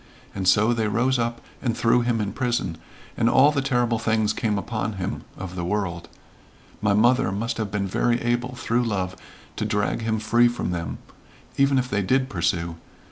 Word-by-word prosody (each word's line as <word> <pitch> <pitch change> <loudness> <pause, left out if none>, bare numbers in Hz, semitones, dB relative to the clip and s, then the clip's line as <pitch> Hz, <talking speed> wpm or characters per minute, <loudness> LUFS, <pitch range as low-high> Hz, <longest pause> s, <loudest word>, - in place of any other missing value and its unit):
And 95 -2 -3
so 105 +5 +5
they 110 -2 0
rose 120 +4 +1
up 115 0 -2 0.2
and 120 -3 -1
threw 120 +1 +3
him 120 -1 0
in 100 -1 -2
prison, 120 - -1 0.4
and 115 0 +2
all 135 +4 +6
the 145 -2 0
terrible 120 -4 +1
things 110 -2 +1
came 105 -2 -1
upon 110 +1 -3
him 95 -2 -4 0.2
of 90 -1 -7
the 90 - -3
world. 90 -2 -2 0.7
My 100 -1 +2
mother 120 -1 +3
must 110 +4 -2
have 110 -2 -2
been 100 0 -1
very 120 +5 +1
able 120 +1 -1
through 120 0 0
love 95 -5 -2 0.4
to - - -1
drag 105 0 0
him 110 0 0
free 115 +3 +4
from 120 -6 -2
them, 85 -2 -3 0.6
even 140 0 +3
if 125 -1 +1
they 100 -5 0
did 130 +7 +1
pursue. 85 -2 -1
110 Hz, 190 wpm, -24 LUFS, 100-120 Hz, 0.7 s, all